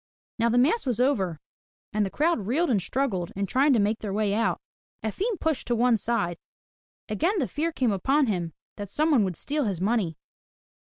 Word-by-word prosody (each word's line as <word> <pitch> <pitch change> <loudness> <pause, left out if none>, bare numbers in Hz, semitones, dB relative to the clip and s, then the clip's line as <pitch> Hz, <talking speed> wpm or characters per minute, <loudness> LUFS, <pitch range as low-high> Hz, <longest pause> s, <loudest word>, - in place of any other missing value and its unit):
Now 230 +1 +3
the 240 - +2
mass 285 - +3
was 240 -3 0
over 195 - +1 0.5
and 210 0 +2
the 195 - -1
crowd 295 - 0
reeled 290 +6 +1
and 205 -5 +2
struggled, 190 -4 -1
in 200 +1 -1
trying 270 +9 +3
to 235 - +3
make 210 +2 +1
their 210 - -4
way 205 0 0
out. 225 +2 +1 0.4
Efim 295 - -1
was - - -5
pushed 320 -4 -1
to 240 - +1
one 240 +1 +4
side. 210 -6 -1 0.7
Again 330 - 0
the 275 -9 0
fear 320 +3 -2
came 255 -7 +1
upon 270 +10 +2
him 175 -7 -2 0.3
that 205 -2 -6
some 310 +9 +1
one 250 -8 +5
would 180 -4 -4
steal 295 -1 -1
his 195 -5 -2
money. 190 -5 0
230 Hz, 200 wpm, -26 LUFS, 200-280 Hz, 0.7 s, one